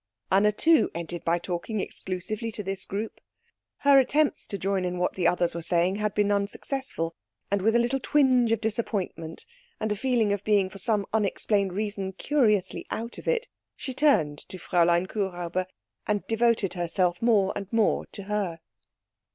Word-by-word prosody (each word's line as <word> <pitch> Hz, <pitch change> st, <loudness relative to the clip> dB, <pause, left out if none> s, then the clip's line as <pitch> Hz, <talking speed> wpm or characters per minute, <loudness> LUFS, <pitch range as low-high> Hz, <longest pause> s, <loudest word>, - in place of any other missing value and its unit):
Anna, 200 Hz, +2 st, +5 dB
too, 320 Hz, +9 st, +4 dB
ended 170 Hz, 0 st, -5 dB
by 170 Hz, +1 st, +2 dB
talking 180 Hz, +5 st, -3 dB
exclusively 195 Hz, +4 st, -3 dB
to 210 Hz, -, -4 dB
this 195 Hz, 0 st, -2 dB
group. 210 Hz, +3 st, -5 dB, 0.6 s
Her 280 Hz, -1 st, +7 dB
attempts 290 Hz, +3 st, +1 dB
to 200 Hz, -, -4 dB
join 195 Hz, -1 st, -1 dB
in 180 Hz, 0 st, -2 dB
what 180 Hz, 0 st, 0 dB
the 180 Hz, -3 st, +1 dB
others 175 Hz, -1 st, +1 dB
were 170 Hz, -, -4 dB
saying 175 Hz, +3 st, +1 dB
had 210 Hz, -1 st, -1 dB
been 205 Hz, -1 st, +2 dB
unsuccessful; 200 Hz, -3 st, -1 dB, 0.4 s
and 200 Hz, -1 st, +1 dB
with 225 Hz, +4 st, +2 dB
a -, -, +7 dB
little 240 Hz, +3 st, +1 dB
twinge 255 Hz, -4 st, +3 dB
of 225 Hz, -, +2 dB
disappointment, 205 Hz, -7 st, -3 dB, 0.3 s
and 215 Hz, -1 st, -1 dB
a -, -, +1 dB
feeling 230 Hz, -3 st, +1 dB
of 200 Hz, -1 st, -3 dB
being 200 Hz, -3 st, +2 dB
for 195 Hz, -, -10 dB
some 205 Hz, 0 st, +1 dB
unexplained 200 Hz, -2 st, +1 dB
reason 200 Hz, -1 st, -3 dB
curiously 215 Hz, -4 st, +1 dB
out 230 Hz, +2 st, -5 dB
of -, -, -12 dB
it, 485 Hz, -2 st, +1 dB, 0.3 s
she 260 Hz, -, -6 dB
turned 205 Hz, -, +2 dB
to 185 Hz, -, -6 dB
Fräulein 175 Hz, 0 st, +2 dB
Kuhräuber, 185 Hz, -3 st, -2 dB, 0.4 s
and 210 Hz, -1 st, 0 dB
devoted 225 Hz, -3 st, +1 dB
herself 175 Hz, 0 st, 0 dB
more 215 Hz, -5 st, +3 dB
and 200 Hz, -1 st, -6 dB
more 225 Hz, -2 st, +2 dB
to 200 Hz, -, -9 dB
her. 195 Hz, -5 st, -2 dB
200 Hz, 170 wpm, -27 LUFS, 180-225 Hz, 0.6 s, Her